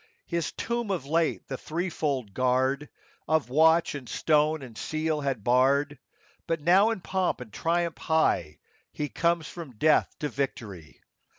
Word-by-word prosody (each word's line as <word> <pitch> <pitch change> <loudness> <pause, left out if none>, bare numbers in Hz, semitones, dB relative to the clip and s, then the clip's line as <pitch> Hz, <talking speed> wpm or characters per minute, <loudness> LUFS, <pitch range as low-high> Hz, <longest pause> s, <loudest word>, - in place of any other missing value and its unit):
His 170 -2 -2
tomb 235 -2 -3
of 180 -9 -2
late 160 +3 0
the 135 - -5
threefold 155 - -2
guard 130 +4 +1 0.4
Of 155 -5 +1
watch 160 +4 +4
and 135 -4 -7
stone 155 -1 +2
and 120 -4 -11
seal 155 +2 -2
had 135 -7 -2
barred; 135 +4 +2 0.5
But 165 -1 0
now, 185 +8 +5
in 225 -5 -3
pomp 185 0 -1
and 115 -5 -10
triumph 170 0 -1
high, 125 - +1 0.3
He 150 -1 -4
comes 170 -1 0
from 160 -8 -9
death 155 +6 +4
to 150 - -2
victory. 110 - -5
150 Hz, 150 wpm, -27 LUFS, 130-165 Hz, 0.5 s, now